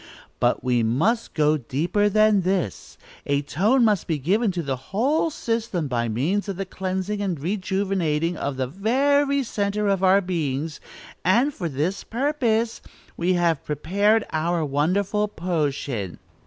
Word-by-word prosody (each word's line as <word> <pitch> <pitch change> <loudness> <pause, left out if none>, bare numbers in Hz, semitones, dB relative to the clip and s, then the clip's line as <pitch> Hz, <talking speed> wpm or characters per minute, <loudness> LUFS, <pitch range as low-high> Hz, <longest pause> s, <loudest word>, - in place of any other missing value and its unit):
But - - +1
we 125 -2 +2
must 160 - 0
go 150 0 +3
deeper 165 - 0
than 215 -1 +4
this; 180 - -2 0.3
a 140 0 +1
tone 215 - +2
must 210 -5 +1
be 160 - 0
given 195 - +1
to 175 -1 -2
the 135 -2 -1
whole 275 +11 +1
system 225 - -2
by 120 -2 -1
means 170 - -1
of 195 - -2
the 195 +2 -3
cleansing 190 +2 -3
and 185 -6 -2
rejuvenating 185 -2 -1
of 140 -3 -3
the 130 - 0
very 275 - +2
centre 205 -2 -1
of 195 -1 +1
our 190 +1 +6
beings, 160 -5 -2 0.4
and, 240 +11 +3
for 175 -8 -4
this 155 +8 -2
purpose, 235 -3 0 0.3
we 175 +2 +1
have 170 -4 +1
prepared 200 +9 +1
our 165 +1 0
wonderful 185 +9 +1
potion." 145 - -2
185 Hz, 145 wpm, -24 LUFS, 150-210 Hz, 0.4 s, our